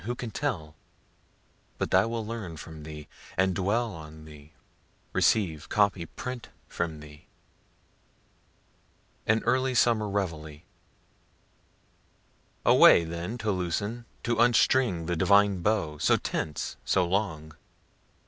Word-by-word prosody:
who 120 +2 -2
can 120 -2 -6
tell?) 100 - -3 1.0
but - - -3
I 95 +4 +5
will 115 -1 -3
learn 105 -8 -6
from 80 0 -10
thee, 75 0 -9 0.3
and 95 0 +2
dwell 105 +5 0
on 80 -1 -11
thee 75 0 -14 0.6
receive, 80 -8 +1
copy, 100 -5 +1
print 125 +5 -7 0.2
from 80 -3 -4
thee. 75 0 -14 2.0
AN 110 +1 +2
EARLY 130 +2 +1
SUMMER 115 -3 +3
REVEILLE 80 -7 -3 2.0
Away 85 - +7
then 85 +7 -5
to 110 -3 -1
loosen, 100 +6 -2 0.2
to 120 -1 0
unstring 120 -6 +3
the 85 +1 -1
divine 100 +2 +4
bow, 85 -7 0
so - - +3
tense, 75 -2 -4
so 90 -2 +2
long. 85 -5 -2
95 Hz, 115 wpm, -28 LUFS, 80-110 Hz, 2.0 s, Away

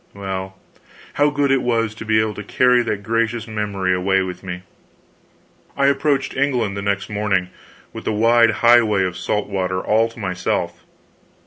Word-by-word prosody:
Well, 95 -1 -5 0.6
how 145 +1 +3
good 145 -1 0
it 135 -1 +3
was 115 -3 0
to 110 - -9
be 110 0 +3
able 110 -1 0
to 105 - -7
carry 125 +4 +3
that 105 -3 -3
gracious 115 +1 -1
memory 105 -4 -1
away 95 +1 +1
with 90 -1 -6
me! 90 -1 -7 1.1
I 140 - +2
approached 140 0 +1
England 125 -7 0
the 100 - -4
next 100 0 -1
morning, 100 -3 -1 0.4
with - - -8
the - - 0
wide 115 +2 +4 0.2
highway 115 -5 +5
of 90 -2 -2
salt 105 +2 -2
water 95 -2 -2
all 110 +4 +1
to 115 - -18
myself. 95 -3 -3
105 Hz, 165 wpm, -20 LUFS, 95-120 Hz, 1.1 s, highway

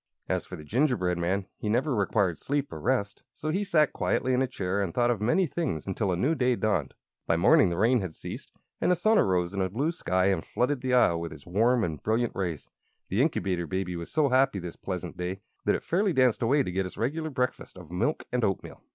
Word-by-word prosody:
As - - -1
for - - -7
the 75 - -10
gingerbread 105 - +1
man, 95 +3 0
he 105 - -3
never 130 +6 +1
required 100 -4 +1
sleep 145 0 -2
or - - -6
rest; 110 -6 -1
so 155 - -3
he 195 +5 0
sat 160 -7 +2
quietly 130 - 0
in 125 - +2
a 130 - +2
chair 100 -5 -2
and 95 -4 -3
thought 120 0 +3
of 110 -4 -2
many 125 - +3
things 150 - -3
until 95 0 -1
a 90 - 0
new 135 - +2
day 125 -5 +2
dawned. 100 - -1 0.3
By 80 - +2
morning 90 +2 +5
the 85 - -3
rain 115 +4 +3
had 90 -5 -5
ceased - - -8 0.3
and - - +2
the 180 - +5
sun 215 +6 +3
arose 90 -1 +1
in 100 - -1
a 95 - 0
blue 135 - 0
sky 95 - +1
and 90 -4 -1
flooded 125 +2 -1
the 130 -1 +1
Isle 85 -9 +4
with 85 0 -5
its 70 - -12
warm 115 +6 +2
and 80 -6 -3
brilliant 115 +2 0
rays. 85 -6 -3 0.4
The 100 +6 +1
Incubator 95 - 0
Baby 90 +2 -2
was 85 0 -6
so 150 -3 +2
happy 130 -4 +3
this 90 -2 -6
pleasant - - -5
day 90 +2 -4 0.2
that - - +3
it - - -4
fairly 190 +2 +1
danced 130 -4 +3
away 135 +5 +3
to 90 - -4
get 95 +1 -1
its - - -12
regular 155 +7 -1
breakfast 125 -7 -3
of 90 -3 -12
milk 95 - -1
and 125 -1 0
oatmeal. 95 -2 -2
110 Hz, 240 wpm, -28 LUFS, 90-130 Hz, 0.4 s, morning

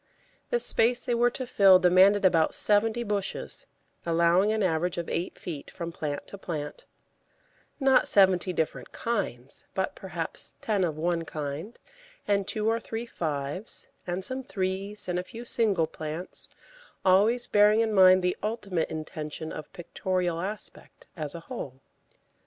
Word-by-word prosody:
The 485 - +1
space 240 - +3
they 245 - 0
were 240 +1 +3
to 255 +1 -4
fill 195 -6 +6
demanded 185 +3 +5
about 165 -4 +4
seventy 220 +3 +2
bushes, 205 -3 -3 0.4
allowing 170 +4 +3
an 220 -1 0
average 175 0 0
of 170 - -3
eight 170 +2 -3
feet 155 -5 -7
from 170 -2 -6
plant 145 -3 -4
to 200 - -9
plant 150 -5 -5 0.9
not 270 -2 +4
seventy 190 -2 +4
different 160 -3 -3
kinds, 140 - -2
but, 190 0 -1
perhaps, 175 -4 -5
ten 205 -4 0
of 160 -4 -1
one 170 +1 0
kind, 155 +7 -6 0.5
and 200 -1 +1
two 215 -1 -1
or 225 +1 +2
three 230 0 -5
fives, 155 -1 -4 0.2
and 180 +2 -2
some 260 +1 -3
threes, 195 -2 -2
and 180 0 -1
a - - -3
few 230 +5 -10
single 210 -9 +2
plants, 155 +3 -7 0.6
always 210 +6 +4
bearing 210 +2 +4
in 220 -1 0
mind 185 -1 +7
the 180 0 +1
ultimate 205 -6 -2
intention 155 0 -6
of 155 - -8
pictorial 180 -1 -2
aspect 205 +2 -8
as 155 -2 -5
a 170 - -7
whole. 145 - -7
185 Hz, 150 wpm, -27 LUFS, 165-215 Hz, 0.9 s, mind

